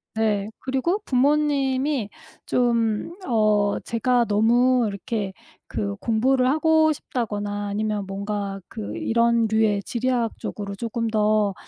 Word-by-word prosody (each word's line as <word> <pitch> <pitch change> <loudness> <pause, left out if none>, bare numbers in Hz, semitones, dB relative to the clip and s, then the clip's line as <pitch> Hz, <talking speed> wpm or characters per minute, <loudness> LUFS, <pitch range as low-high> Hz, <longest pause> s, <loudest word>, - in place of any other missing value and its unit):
네. 215 -2 0
그리고 270 +10 -1
부모님이 275 -2 +1 0.4
좀 230 -3 +1 0.3
어 215 -4 +2
제가 240 +1 +1
너무 240 +4 +3
이렇게 200 0 -4 0.3
그 100 -3 -3
공부를 255 +3 +2
하고 315 +1 +3
싶다거나 205 -7 -3
아니면 210 0 -2
뭔가 200 0 -4
그 105 +1 -6
이런 235 - +2
류의 215 -2 +2
지리학 240 -1 -1
쪽으로 200 -1 -5
쪼금 230 +2 -3
더 215 -2 +2
225 Hz, 235 characters per minute, -23 LUFS, 205-255 Hz, 0.4 s, 너무